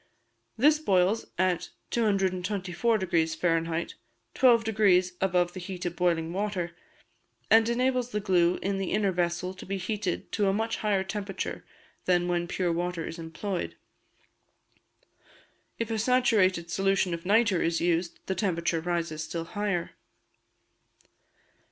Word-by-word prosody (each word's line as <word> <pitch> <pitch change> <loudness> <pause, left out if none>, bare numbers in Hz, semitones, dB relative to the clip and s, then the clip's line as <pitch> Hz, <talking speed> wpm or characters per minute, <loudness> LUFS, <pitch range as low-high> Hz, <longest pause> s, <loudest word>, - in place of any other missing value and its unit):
This 300 +6 +5
boils 195 -5 +2
at 185 -1 +1 0.2
224° 195 -3 0 0.6
Fahr., 165 0 0 0.4
12° 220 -7 +4
above 180 -2 +2
the 185 - -6
heat 180 0 -6
of 175 -1 -2
boiling 170 -2 0
water, 185 -3 -2 0.8
and 225 +1 +6
enables 250 0 +1
the 210 - -2
glue 180 -3 +2
in 195 0 -1
the 190 - -2
inner 200 -2 +2
vessel 180 +1 -1
to 185 - -11
be 195 +1 -3
heated 190 0 -3
to 205 -2 +1
a 195 - +2
much 225 +2 -1
higher 205 -3 +1
temperature 195 -1 -4 0.4
than 175 -1 +2
when 175 -1 0
pure 175 -1 -1
water 175 -1 -2
is 165 - -7
employed. 170 +3 -4 2.0
If 230 -1 -3
a 220 - -1
saturated 210 -8 +2
solution 195 -1 +1
of 165 0 -5
nitre 205 -1 +3
is 165 0 +1
used, 170 0 0
the 190 - -1
temperature 170 -3 0
rises 165 -2 -2
still 165 +1 -4
higher. 200 -2 -2
185 Hz, 130 wpm, -28 LUFS, 175-210 Hz, 2.0 s, and